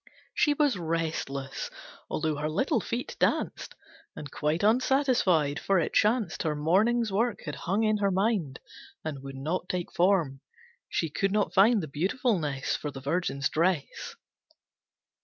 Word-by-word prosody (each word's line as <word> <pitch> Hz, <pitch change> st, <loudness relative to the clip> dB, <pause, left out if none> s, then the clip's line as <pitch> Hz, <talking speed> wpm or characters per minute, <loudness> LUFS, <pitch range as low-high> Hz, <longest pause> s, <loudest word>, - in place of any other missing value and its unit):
She 295 Hz, -1 st, +2 dB
was 285 Hz, -9 st, +2 dB
restless, 160 Hz, -5 st, -3 dB, 0.4 s
although 155 Hz, -1 st, -1 dB
her 150 Hz, +1 st, -2 dB
little 265 Hz, -, +1 dB
feet 240 Hz, +2 st, -4 dB
danced, -, -, 0 dB, 0.4 s
And 145 Hz, -2 st, -8 dB
quite 155 Hz, +5 st, -1 dB
unsatisfied, 220 Hz, -, +3 dB
for 195 Hz, -, +1 dB
it 165 Hz, -, -1 dB
chanced 215 Hz, -4 st, +2 dB
Her 155 Hz, -2 st, -1 dB
morning's 210 Hz, +9 st, +2 dB
work 225 Hz, +3 st, 0 dB
had 150 Hz, -, -4 dB
hung 195 Hz, +9 st, -1 dB
in 215 Hz, -1 st, +2 dB
her 200 Hz, -1 st, +1 dB
mind 190 Hz, -, 0 dB, 0.5 s
And 145 Hz, -4 st, -4 dB
would 135 Hz, 0 st, -8 dB
not 165 Hz, +6 st, -3 dB
take 180 Hz, -1 st, -3 dB
form. 170 Hz, -7 st, +2 dB, 0.5 s
She 165 Hz, -3 st, -1 dB
could 195 Hz, +5 st, 0 dB
not 210 Hz, 0 st, +1 dB
find 205 Hz, +1 st, +5 dB
The -, -, -4 dB
beautifulness 160 Hz, -, -1 dB
For 150 Hz, -, -4 dB
the 135 Hz, -2 st, -8 dB
Virgin's 140 Hz, -1 st, -1 dB
dress. 165 Hz, -2 st, -1 dB
175 Hz, 145 wpm, -28 LUFS, 150-215 Hz, 0.5 s, find